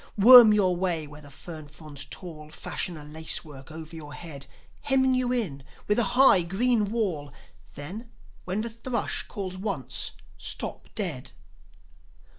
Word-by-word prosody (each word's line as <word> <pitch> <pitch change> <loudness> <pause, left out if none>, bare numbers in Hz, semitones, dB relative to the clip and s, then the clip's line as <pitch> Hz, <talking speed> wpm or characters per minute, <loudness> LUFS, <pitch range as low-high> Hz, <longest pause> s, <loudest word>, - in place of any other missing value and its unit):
Worm 235 +1 +10
your 190 -4 +3
way 175 -3 -1
where 150 +1 -12
the 145 - -13
fern 155 +2 -10
fronds 150 -1 -7
tall 155 -4 -9
Fashion 170 +2 -4
a 150 - -10
lace 160 +2 0
work 140 -1 -12
over 160 +1 -9
your 150 -2 -9
head, 140 -5 -8 0.3
Hemming 265 -1 +2
you 255 -1 +1
in 195 - -2 0.3
with 210 +3 +2
a - - +4
high, 265 -8 +7
green 210 +4 +1
wall; 185 -11 -2 0.4
Then, 190 - -7 0.3
when 185 +3 -2
the 235 - -4
thrush 235 +2 -2
calls 185 -2 -6
once, 190 - 0 0.3
stop - - -4
dead. - - -4
180 Hz, 150 wpm, -26 LUFS, 150-220 Hz, 0.4 s, Worm